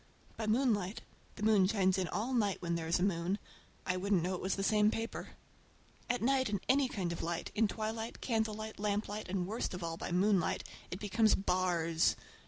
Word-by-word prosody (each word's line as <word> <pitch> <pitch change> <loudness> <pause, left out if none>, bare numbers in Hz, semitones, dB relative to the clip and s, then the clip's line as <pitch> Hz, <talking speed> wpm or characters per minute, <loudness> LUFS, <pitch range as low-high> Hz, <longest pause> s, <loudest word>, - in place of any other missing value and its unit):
By 220 - -3
moonlight—the 215 -3 -1
moon 210 -4 +5
shines 190 -2 +2
in 185 - 0
all 220 +9 -2
night 210 -5 +1
when 170 -1 -2
there 165 -1 -2
is 165 - +3
a 180 - 0
moon—I 185 0 -3
wouldn't 190 -2 +1
know 185 +2 -1
it 180 - -4
was 190 - 0
the 195 - -2
same 210 +1 +4
paper. 225 +1 -4 0.7
At 245 -2 0
night 260 0 +3
in 205 -1 0
any 270 -1 +3
kind 185 -7 -2
of 170 - -4
light, 170 0 -3
in 220 0 +3
twilight, 220 +2 -4
candlelight, 220 -2 -2
lamplight, 210 0 -2
and 185 -1 -1
worst 210 -1 -3
of 180 - -6
all 165 0 -3
by - - -5
moonlight, 185 0 +2 0.3
it 180 - -5
becomes 215 +1 +3
bars! 175 -4 +1
200 Hz, 190 wpm, -34 LUFS, 180-220 Hz, 0.7 s, moon